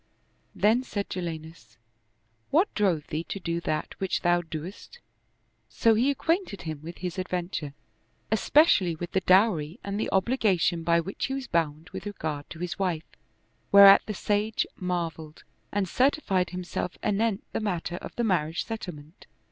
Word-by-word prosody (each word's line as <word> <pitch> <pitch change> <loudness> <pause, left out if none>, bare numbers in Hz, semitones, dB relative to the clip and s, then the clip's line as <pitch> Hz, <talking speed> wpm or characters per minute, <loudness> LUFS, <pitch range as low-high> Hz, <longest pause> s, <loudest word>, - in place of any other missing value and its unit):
Then 220 +5 +3
said 205 -5 -4
Jalinus, 160 -9 -6 0.3
" - - -45 0.3
What 345 +8 +2
drove 185 -8 +1
thee 155 +2 -2
to 200 - -5
do 170 -1 -2
that 155 -2 -2
which 190 -1 -1
thou 175 0 +3
dost?" 165 +3 -8 0.7
So 225 - +3
he 240 +5 +3
acquainted 325 - -1
him 155 -3 -5
with 170 +2 -8
his 180 0 -4
adventure, 175 -6 -3 0.6
especially 215 - +4
with 175 +2 -6
the 190 - +1
dowry 185 -5 +3
and 200 +1 -3
the - - -1
obliga 200 -1 +2
tion 170 -1 +1
by 170 +1 +3
which 195 +4 -4
he 270 - -2
was 270 -1 -4
bound 165 - -1
with 195 - -6
regard 155 -7 -5
to 160 - -9
his 180 +2 -4
wife, 175 -4 -1 0.7
whereat 200 0 +10
the 215 - -3
sage 210 +2 0
marveled 165 -4 -4 0.3
and 200 -2 0
certified 210 - +1
himself 180 0 -4
anent 210 0 0
the - - -2
matter 175 -5 -2
of - - -9
the 240 - -1
marriage 170 -6 0
settlement. 175 -7 -8
180 Hz, 160 wpm, -27 LUFS, 165-210 Hz, 0.7 s, whereat